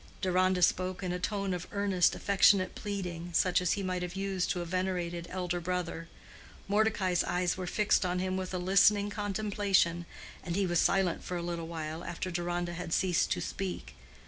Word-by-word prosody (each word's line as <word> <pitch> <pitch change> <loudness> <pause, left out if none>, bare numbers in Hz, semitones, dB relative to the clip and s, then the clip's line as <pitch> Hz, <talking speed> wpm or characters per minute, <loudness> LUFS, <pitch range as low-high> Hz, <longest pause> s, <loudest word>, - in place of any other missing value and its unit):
Deronda 185 -1 +2
spoke 185 +2 +1
in 180 - -1
a 180 - -2
tone 195 0 -1
of 180 -1 -5
earnest, 200 -3 +2
affectionate 195 -1 +4
pleading, 180 -4 -5
such 180 +1 +3
as 180 - +2
he 200 - -3
might 185 -1 -2
have 180 0 -4
used 195 -2 -1
to 180 - 0
a 175 - -3
venerated 175 -1 -2
elder 180 -1 -2
brother. 175 -1 -3 0.6
Mordecai's 200 -4 +2
eyes 180 -1 0
were 185 -1 -5
fixed 210 +2 +2
on 180 0 -1
him 185 +1 -1
with 185 -1 -3
a 185 - -2
listening 195 +3 +4
contemplation, 200 -4 0 0.4
and 175 -1 -3
he 200 0 +2
was 175 -2 +1
silent 190 -3 +2
for 180 - -4
a 170 - -4
little 170 -1 -4
while 160 0 -5
after 180 +2 -4
Deronda 175 0 -2
had 170 -1 -4
ceased 180 -3 +2
to - - -4
speak. 190 -2 -5
180 Hz, 185 wpm, -31 LUFS, 175-195 Hz, 0.6 s, affectionate